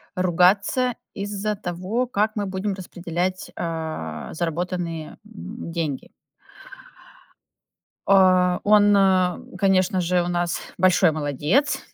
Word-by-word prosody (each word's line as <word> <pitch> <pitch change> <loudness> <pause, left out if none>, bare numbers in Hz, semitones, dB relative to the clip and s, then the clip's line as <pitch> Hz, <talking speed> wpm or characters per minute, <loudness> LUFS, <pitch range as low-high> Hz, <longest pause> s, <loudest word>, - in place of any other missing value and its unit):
ругаться 190 +7 +2 0.2
из-за 205 +1 -3
того, 190 +8 -3
как 215 -1 0
мы 205 -1 -1
будем 190 +1 -3
распределять, 180 0 -4
а, 160 - -5
заработанные, 170 -1 -3
м, 90 - -9
деньги. 160 -5 -4 2.0
А, 185 -2 +4
он, 205 0 +5 0.6
конечно 190 -1 +2
же, 175 +1 +1
у - - -4
нас 175 -1 -1 0.2
большой 185 -1 +4
молодец. 155 - 0
180 Hz, 95 wpm, -23 LUFS, 170-200 Hz, 2.0 s, он